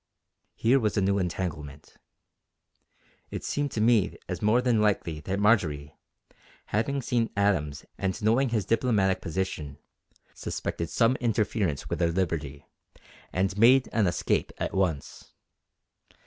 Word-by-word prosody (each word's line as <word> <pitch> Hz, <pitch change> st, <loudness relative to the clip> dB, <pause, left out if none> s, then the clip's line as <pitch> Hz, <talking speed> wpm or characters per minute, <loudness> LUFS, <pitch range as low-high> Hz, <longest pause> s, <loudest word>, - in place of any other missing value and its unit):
Here 125 Hz, +4 st, +3 dB
was 110 Hz, -2 st, -1 dB
a -, -, +3 dB
new 100 Hz, +1 st, +2 dB
entanglement. 80 Hz, -5 st, -5 dB, 1.3 s
It -, -, -6 dB
seemed 145 Hz, 0 st, -1 dB
to 110 Hz, -, -1 dB
me 115 Hz, -3 st, +3 dB
as -, -, -4 dB
more 110 Hz, +3 st, +3 dB
than 125 Hz, -3 st, +2 dB
likely 90 Hz, -7 st, 0 dB
that 95 Hz, +6 st, -3 dB
Marjory, 80 Hz, -10 st, +1 dB, 0.7 s
having 135 Hz, +6 st, -1 dB
seen 115 Hz, -2 st, 0 dB
Adams 85 Hz, -8 st, 0 dB
and 95 Hz, +1 st, -1 dB
knowing 120 Hz, +5 st, +3 dB
his 110 Hz, -5 st, -1 dB
diplomatic 100 Hz, -5 st, +1 dB
position, 80 Hz, -5 st, -4 dB, 0.6 s
suspected 85 Hz, -1 st, -4 dB
some 125 Hz, +2 st, +2 dB
interference 110 Hz, -, -1 dB
with -, -, -3 dB
her 85 Hz, -1 st, +2 dB
liberty, 80 Hz, -6 st, -2 dB, 0.7 s
and 95 Hz, +1 st, 0 dB
made 130 Hz, +4 st, +6 dB
an 110 Hz, -4 st, +2 dB
escape 85 Hz, -, 0 dB
at -, -, -3 dB
once. 90 Hz, -7 st, -2 dB
100 Hz, 130 wpm, -27 LUFS, 85-115 Hz, 1.3 s, made